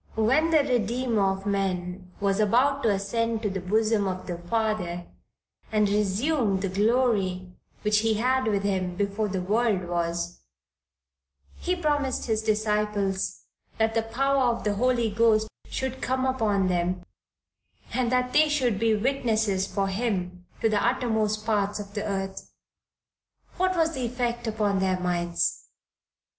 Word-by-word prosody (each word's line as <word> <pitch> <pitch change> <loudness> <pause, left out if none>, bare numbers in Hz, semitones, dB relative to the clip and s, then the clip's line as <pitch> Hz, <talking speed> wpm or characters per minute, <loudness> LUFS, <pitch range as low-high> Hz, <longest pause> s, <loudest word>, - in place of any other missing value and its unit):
When 265 +9 +3
the 315 -3 +4
Redeemer 240 -4 +1
of 195 +1 -5
men 185 -2 -2
was 200 0 +1
about 255 +7 +3
to 225 - +2
ascend 225 +3 -1
to 210 - 0
the 190 - -3
bosom 215 +2 +1
of 185 0 -4
the 175 -1 -5
Father 180 -3 -1 0.7
and 210 -1 +3
resume 210 +2 +1
the 195 0 -2
glory 200 -3 +1 0.3
which 210 0 +3
he 220 0 +1
had 255 +3 +1
with 200 -2 +1
Him 185 -3 -1
before 200 +3 -1
the 190 -2 -2
world 210 -1 +1
was, 170 0 -2 1.2
he 360 - 0
promised 290 -6 0
his 220 -2 0
disciples 210 -2 0 0.3
that 220 0 +1
the 225 - +2
power 270 +5 +1
of 235 -1 0
the 210 - +1
Holy 240 +1 +1
Ghost 220 0 +3 0.2
should 265 0 -3
come 260 +1 0
upon 215 -7 +1
them, 180 0 0 0.9
and 250 -2 0
that 250 0 +1
they 310 0 +5
should 250 -9 +1
be 225 -1 +3
witnesses 220 -5 0
for 195 -1 -1
Him 185 -4 -2
to 225 - +3
the 210 -2 +1
uttermost 220 -4 0
parts 205 -2 0
of 200 -1 -8
the 205 - -3
earth. 195 -2 -4 1.1
What 370 0 +1
was 325 0 +2
the 255 -3 -2
effect 240 -1 -2
upon 210 -3 0
their 190 -1 +1
minds?" 175 - -1
215 Hz, 150 wpm, -26 LUFS, 195-240 Hz, 1.2 s, they